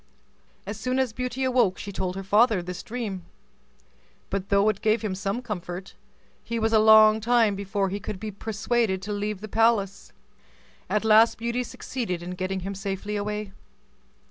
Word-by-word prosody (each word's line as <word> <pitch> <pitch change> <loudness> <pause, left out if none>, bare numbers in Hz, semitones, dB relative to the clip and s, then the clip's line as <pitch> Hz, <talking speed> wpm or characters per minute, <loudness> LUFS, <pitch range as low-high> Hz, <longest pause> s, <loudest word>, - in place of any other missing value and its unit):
As 205 +1 -6
soon 255 +2 -1
as 260 -4 0
Beauty 250 +2 -3
awoke 245 -7 +2
she 200 - -6
told 185 -1 -3
her 195 - -5
father 210 0 +3
this 180 0 -6
dream; 225 -6 -5 1.1
but 195 0 -3
though 200 0 +3
it 215 - 0
gave 220 0 +2
him 210 -3 -1
some 195 +5 -3
comfort, 185 -4 -6 0.5
he 235 - -3
was 225 0 0
a 220 - +6
long 215 0 +7
time 230 -2 +3
before 195 0 -1
he 200 +2 -3
could 200 -1 -6
be 215 +1 -5
persuaded 210 -1 -1
to 210 - -5
leave 205 -1 -3
the 215 - -6
palace. 215 -3 +1 0.8
At 215 +1 0
last 220 +1 +6
Beauty 235 +2 -2
succeeded 225 -8 -5
in 180 - -6
getting 185 +1 -3
him 195 +2 -4
safely 195 +1 -4
away. 210 0 -3
210 Hz, 170 wpm, -25 LUFS, 195-225 Hz, 1.1 s, long